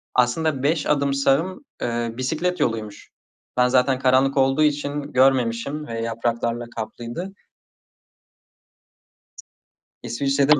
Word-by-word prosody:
aslında 135 +3 +1
5 150 +1 +1
adım 140 -1 +2
sağım, 140 - +1 0.2
eee, 120 -1 -2
bisiklet 160 +7 -1
yoluymuş. 110 -6 -2 0.5
Ben 125 0 +5
zaten 130 +1 +3
karanlık 135 +1 +3
olduğu 135 +3 +3
için 145 -1 0
görmemişim 130 +2 +2
ve 115 0 -4
yapraklarla 115 +1 -2
kaplıydı. 120 - -5 2.7
İsviçre'de 140 +3 +2
135 Hz, 95 wpm, -23 LUFS, 120-145 Hz, 2.7 s, Ben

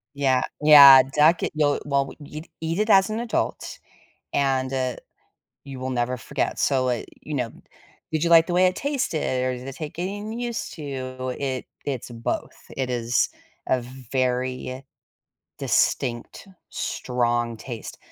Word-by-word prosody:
Yeah. 135 -2 +2 0.2
Yeah, 140 -3 +10
duck 155 +3 +4
it - - -1
you'll 145 -2 +2
well 140 -1 +2
w - - -11
you'd 155 +2 -9
eat 165 +3 -2
it 215 +1 0
as 195 0 +6
an 215 - -2
adult 235 -1 -3 0.5
and, 135 -1 0
uh, 130 -2 -1 0.7
you 135 -2 -8
will 130 0 -3
never 125 0 -1
forget, 135 +3 -3
so, 130 -2 +2
uh, 120 -2 -1 0.2
you 155 - -6
know, 125 -4 -1 0.6
did 155 0 0
you 170 - +1
like 165 -1 +7
the 180 - -3
way 185 +1 +5
it 185 0 0
tasted, 205 - -1
or 130 0 -1
did 125 +1 -9
it 135 - -6
take 155 -2 -7
getting 205 +5 -4
used 240 -2 -4
to? 130 -4 -5
It 130 -3 -3 0.2
it's 135 -4 -4
both, 115 0 -4 0.2
it 130 -1 -1
is 120 -1 0 0.4
a 130 - +1 0.3
very, 130 0 -1
uh, 130 +1 -6 0.8
distinct, 120 +9 -1 0.2
strong 120 -2 -1
taste. 115 +1 -8
135 Hz, 160 wpm, -24 LUFS, 125-155 Hz, 0.8 s, Yeah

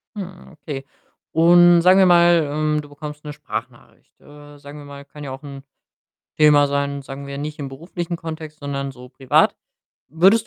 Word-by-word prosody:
Hm, 190 -3 -9
okay. 145 -3 -7 0.5
Und 175 +1 +6
sagen 185 +2 +5
wir 190 - +6
mal, 170 -3 +5
ähm, 150 +1 0
du 145 - -14
bekommst 150 +1 -10
'ne 150 - -6
Sprachnachricht. - - -9
Äh, 145 0 -15
sagen 145 +1 -12
wir 145 - -11
mal, 140 0 -11
kann 150 +1 -12
ja 135 - -6
auch 135 +2 -9
'n 140 -2 -10 0.8
Thema 150 -2 +5
sein, 140 0 -2
sagen 135 +1 -9
wir, 140 0 -7
nicht 150 +1 -6
im 140 -2 -5
beruflichen 170 +5 -6
Kontext, 160 -2 -8
sondern 140 -1 -4
so 125 0 -13
privat. 130 0 +2 0.5
Würdest 190 - +3
150 Hz, 180 wpm, -21 LUFS, 140-165 Hz, 0.8 s, Und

